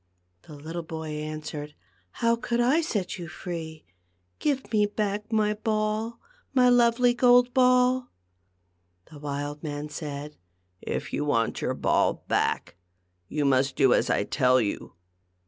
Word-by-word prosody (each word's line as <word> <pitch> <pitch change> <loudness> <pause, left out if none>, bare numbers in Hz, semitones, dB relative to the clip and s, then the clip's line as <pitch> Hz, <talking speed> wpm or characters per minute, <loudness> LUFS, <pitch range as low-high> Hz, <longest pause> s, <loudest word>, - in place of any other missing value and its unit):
The 150 - -10
little 160 +4 -6
boy 160 -1 -6
answered, 150 -1 -6 0.2
" 90 0 -39
How 230 0 +4
could 235 0 -2
I 260 +7 +3
set 205 - -3
you 170 - -6
free? 160 -2 -7 0.5
Give 275 -5 -1
me 210 -1 +4
back 210 +1 -3
my 210 -1 +2
ball 215 +1 -2 0.2
— - - -36
my 250 -1 +6
lovely 245 0 +4
gold 245 0 +5
ball! 250 0 +4 0.5
" 90 0 -46
The 150 - -11
wild 145 0 -4
man 150 -1 -5
said, 150 -1 -6 0.3
" 90 0 -46
If - - -4
you - - 0
want 115 -6 0
your - - -1
ball - - +1
back, - - 0 0.5
you 150 -1 -1
must 135 0 +2
do 135 -3 +4
as - - +2
I - - +2
tell 130 +3 +3
you. 105 -4 -3
165 Hz, 155 wpm, -26 LUFS, 145-235 Hz, 0.5 s, my